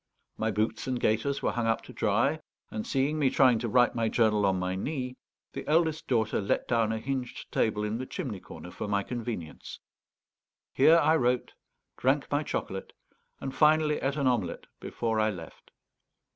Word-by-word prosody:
My 110 Hz, -, -1 dB
boots 110 Hz, +4 st, -1 dB
and 130 Hz, -2 st, -1 dB
gaiters 115 Hz, +7 st, 0 dB
were -, -, +2 dB
hung 120 Hz, -1 st, -1 dB
up 115 Hz, -, +1 dB
to -, -, -12 dB
dry, -, -, +1 dB, 0.3 s
and, 110 Hz, -, -4 dB
seeing 140 Hz, +3 st, 0 dB
me 140 Hz, -3 st, +4 dB
trying 130 Hz, -3 st, +4 dB
to 120 Hz, -, -2 dB
write 125 Hz, +1 st, +4 dB
my 115 Hz, -1 st, 0 dB
journal 105 Hz, -3 st, +3 dB
on 95 Hz, -1 st, +2 dB
my 90 Hz, 0 st, -1 dB
knee, 125 Hz, +5 st, -3 dB, 0.4 s
the -, -, -5 dB
eldest 160 Hz, 0 st, +2 dB
daughter 110 Hz, -4 st, +1 dB
let 100 Hz, -, 0 dB
down 115 Hz, -2 st, +2 dB
a 110 Hz, -, -1 dB
hinged 130 Hz, +1 st, -4 dB
table 105 Hz, -1 st, +1 dB
in 105 Hz, +2 st, -2 dB
the 130 Hz, -, -5 dB
chimney 130 Hz, -, -4 dB
corner 90 Hz, -, -10 dB
for 110 Hz, -, -5 dB
my 100 Hz, -1 st, +1 dB
convenience. 115 Hz, -9 st, -6 dB, 0.9 s
Here 155 Hz, +5 st, +6 dB
I 160 Hz, 0 st, +4 dB
wrote, 125 Hz, -2 st, 0 dB, 0.4 s
drank 135 Hz, +3 st, +1 dB
my 145 Hz, +1 st, +2 dB
chocolate, 95 Hz, -9 st, -4 dB, 0.5 s
and 135 Hz, -, -5 dB
finally 155 Hz, 0 st, +4 dB
ate 135 Hz, +1 st, -1 dB
an 140 Hz, -2 st, -1 dB
omelette 120 Hz, -8 st, 0 dB
before 115 Hz, -2 st, -2 dB
I 110 Hz, 0 st, +3 dB
left. 85 Hz, -6 st, -9 dB
120 Hz, 180 wpm, -29 LUFS, 110-135 Hz, 0.9 s, Here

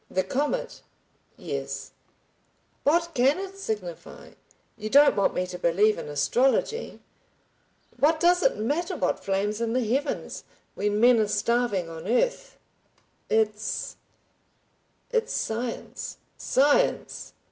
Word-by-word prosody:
"The 185 Hz, -, 0 dB
comet?" 295 Hz, -, -2 dB, 0.6 s
"Yes." -, -, -5 dB, 0.9 s
"What 335 Hz, +3 st, +2 dB
can 265 Hz, +3 st, +3 dB
it 390 Hz, 0 st, -6 dB
signify? 200 Hz, -, -6 dB, 0.4 s
You 215 Hz, 0 st, -5 dB
don't 285 Hz, +4 st, +6 dB
want 200 Hz, -, +1 dB
me 180 Hz, -, 0 dB
to 180 Hz, -1 st, -7 dB
believe 205 Hz, +6 st, +3 dB
in -, -, -7 dB
astrology. 255 Hz, -, 0 dB, 1.0 s
What 310 Hz, +4 st, +3 dB
does 355 Hz, +2 st, +4 dB
it -, -, +2 dB
matter 295 Hz, +10 st, -1 dB
what -, -, -1 dB
flames 205 Hz, +3 st, -1 dB
in 230 Hz, -1 st, -1 dB
the 250 Hz, -1 st, +1 dB
heavens—when 215 Hz, -5 st, -3 dB
men 240 Hz, 0 st, +6 dB
are 215 Hz, -, +2 dB
starving 210 Hz, -3 st, 0 dB
on 165 Hz, +1 st, -8 dB
earth?" 250 Hz, -, 0 dB, 0.7 s
"It's—it's 215 Hz, -1 st, -1 dB, 1.3 s
science." 230 Hz, +2 st, -4 dB, 0.2 s
"Science! 290 Hz, -, +1 dB
235 Hz, 110 wpm, -26 LUFS, 205-295 Hz, 1.3 s, don't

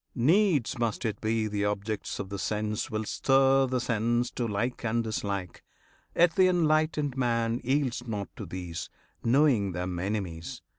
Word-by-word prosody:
Needs 150 Hz, -, +3 dB
must 115 Hz, 0 st, -1 dB
it 110 Hz, -, -2 dB
be 110 Hz, 0 st, 0 dB
The 105 Hz, -1 st, -1 dB
objects 105 Hz, +1 st, -2 dB
of 100 Hz, -2 st, -5 dB
the 100 Hz, -1 st, -5 dB
sense 105 Hz, +1 st, -2 dB
will 110 Hz, 0 st, -2 dB
stir 135 Hz, +3 st, +3 dB
the 130 Hz, 0 st, 0 dB
sense 120 Hz, +1 st, 0 dB
To 120 Hz, -, -2 dB
like 115 Hz, +5 st, -2 dB
and 115 Hz, 0 st, +1 dB
dislike, 100 Hz, -4 st, -3 dB, 0.5 s
yet 170 Hz, -1 st, +5 dB
th' -, -, -5 dB
enlightened 155 Hz, -5 st, +3 dB
man 115 Hz, -2 st, 0 dB
Yields 130 Hz, -2 st, 0 dB
not 100 Hz, -5 st, -4 dB
to -, -, -6 dB
these, 90 Hz, -3 st, -6 dB, 0.3 s
knowing 120 Hz, -6 st, +3 dB
them 90 Hz, 0 st, -3 dB
enemies. 90 Hz, -4 st, -4 dB
115 Hz, 155 wpm, -28 LUFS, 105-135 Hz, 0.5 s, yet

